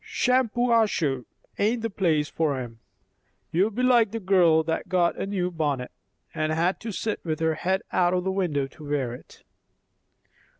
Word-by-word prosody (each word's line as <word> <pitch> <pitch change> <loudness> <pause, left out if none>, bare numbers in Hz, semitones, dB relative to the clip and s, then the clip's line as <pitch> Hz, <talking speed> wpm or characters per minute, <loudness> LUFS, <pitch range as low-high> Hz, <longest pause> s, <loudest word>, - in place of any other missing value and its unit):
Shampuashuh 230 - +1 0.3
ain't 225 +3 +1
the 230 - -1
place 160 -6 +1
for 155 -4 -1
'em. 120 -3 -7 0.7
You'll 190 +6 +2
be 235 +4 -3
like 240 -4 +4
the 225 +3 -4
girl 180 -5 +4
that 160 0 -3
got 180 -2 +2
a - - -2
new 185 -3 -1
bonnet, 145 -6 -2 0.4
and 155 0 -1
had 170 +4 0
to 225 - -5
sit 215 +2 -3
with 155 -2 -2
her 160 0 +1
head 190 +4 -1
out 180 0 +2
o' 180 - +1
window 170 -8 0
to 145 +2 -12
wear 135 -5 -1
it." 125 - -14
175 Hz, 165 wpm, -25 LUFS, 155-210 Hz, 0.7 s, like